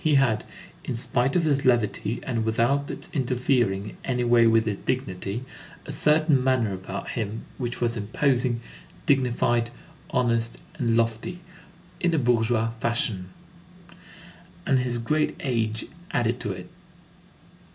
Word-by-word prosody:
He 155 -2 +4
had, 120 -6 +3 0.4
in - - -3
spite 125 +3 0
of 175 - +3
his 140 -3 +2
levity, 115 -2 +1
and 115 -3 -1
without 120 +6 +1
its - - -6
interfering 120 -7 +1
in - - -15
any 125 -1 0
way 120 -1 +5
with 115 0 +4
his 105 -3 -2
dignity, 120 -2 -2 0.4
a - - -6
certain 150 -3 +3
manner 125 -6 +2
about 95 +1 -5
him 110 -1 -3
which 120 -1 -3
was 120 -1 +1
imposing, 120 +2 +1 0.4
dignified, 120 -3 +2 0.4
honest, 115 -2 +1 0.2
and 115 -2 +2
lofty, 115 +9 0 0.6
in 175 -2 +2
a - - +2
bourgeois 115 -3 +2
fashion; 115 -6 -1 1.4
and 135 -3 +3
his 125 -1 -1
great 150 +7 0
age 115 -4 -1 0.3
added 120 0 +1
to 105 -4 -2
it. 90 -1 -7
120 Hz, 135 wpm, -26 LUFS, 110-130 Hz, 1.4 s, way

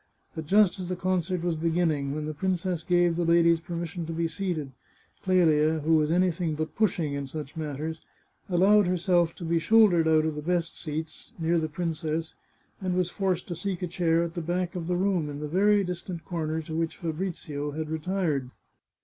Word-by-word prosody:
But 160 -2 -6
just 200 0 +4
as 180 -1 -5
the 185 - -1
concert 185 -1 -1
was 175 -2 0
beginning, 160 -4 0
when 155 0 -3
the 155 - -3
princess 180 0 -1
gave 175 -1 +3
the 175 - 0
ladies 170 0 +4
permission 170 0 -5
to - - -4
be 165 0 0
seated, 165 -5 -3 0.5
Clelia, 160 -4 +3
who 160 +2 +2
was 155 -1 +3
anything 175 -2 +1
but 155 +1 -4
pushing 175 -8 +1
in 140 -1 -3
such 150 0 -7
matters, 155 +1 -4 0.5
allowed 195 +2 +5
herself 175 -2 +2
to - - -9
be 165 0 +1
shouldered 180 -3 +5
out 155 -1 +4
of 160 - 0
the 150 - -5
best 170 +1 -1
seats, 155 0 -6
near 170 0 +1
the 155 -1 -2
princess, 160 0 -3 0.5
and 185 -1 -1
was 180 -1 0
forced 190 -3 -1
to 175 - -3
seek 190 +1 -3
a - - 0
chair 170 -2 +1
at 170 -1 -4
the 175 - -3
back 175 +2 -2
of 170 -2 -4
the 180 0 0
room, 180 -5 +1
in 145 0 -6
the 150 - -4
very 200 +5 +3
distant 180 -1 -5
corner 160 -2 -2
to 155 +1 -6
which 165 0 -2
Fabrizio 160 -4 -4
had 155 +2 -4
retired. 160 -4 -1
170 Hz, 195 wpm, -27 LUFS, 155-180 Hz, 0.5 s, allowed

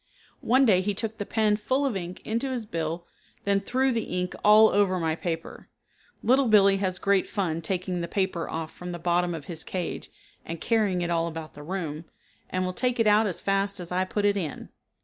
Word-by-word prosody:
One 260 +3 +4
day 190 -6 +4
he 200 +1 -1
took 220 +1 -4
the 205 - -4
pen 215 -2 +2
full 260 +6 0
of 260 -6 0
ink 180 -1 -6
into 235 +5 -1
his 245 -4 -3
bill 165 -2 -3 0.4
then 200 0 +2
threw 260 +6 +1
the 225 -6 -2
ink 180 0 -2
all 215 +1 +8
over 195 -2 +2
my 160 -1 0
paper. 165 -1 -5 0.5
Little 260 +2 +4
Billee 200 -3 +5
has 190 -2 -1
great 200 -1 +2
fun 170 -6 -2
taking 180 0 -2
the 170 - -3
paper 185 -2 -1
off 160 -1 -4
from 180 0 -7
the - - -4
bottom 175 0 +1
of 150 -3 -8
his 165 -2 -6
cage, 180 -2 -4 0.3
and 165 0 -6
carrying 205 -5 +1
it 175 - -2
all 165 0 +1
about 160 -1 -7
the 145 - -11
room, 160 -2 -4 0.4
and 185 0 -1
will 185 - -2
take 250 +3 0
it 225 - +4
out 210 +1 +5
as 185 - -3
fast 195 0 0
as 175 -1 -7
I 185 +1 +1
put 205 +2 -2
it 205 0 +3
in. 165 -7 -5
190 Hz, 215 wpm, -26 LUFS, 170-210 Hz, 0.5 s, all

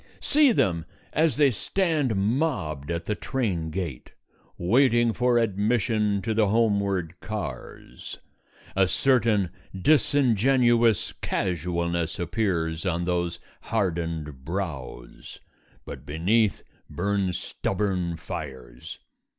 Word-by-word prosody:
See 295 -2 +4
them 85 - +1 0.3
as 160 -1 +2
they 145 -3 +5
stand 155 - 0
mobbed 100 - -1
at 85 0 -3
the 105 - 0
train 100 -10 -2
gate, 80 -7 -5 0.4
waiting 120 +4 +3
for 125 +2 +2
admission 105 -1 +1
to 110 - -1
the 110 -1 +3
homeward 100 -5 +1
cars. 70 - -7 0.6
A 95 0 +4
certain 110 -2 +2 0.3
disingenuous 120 - +3
casualness 85 -2 -1
appears 85 -3 -1
on 85 -2 -1
those 85 -1 -1 0.2
hardened 80 - -2
brows; 75 -8 -6 0.5
but - - -8
beneath 100 +8 +1 0.3
burn 100 0 0
stubborn 90 -2 -2
fires. 65 -7 -8
95 Hz, 95 wpm, -26 LUFS, 85-115 Hz, 0.6 s, they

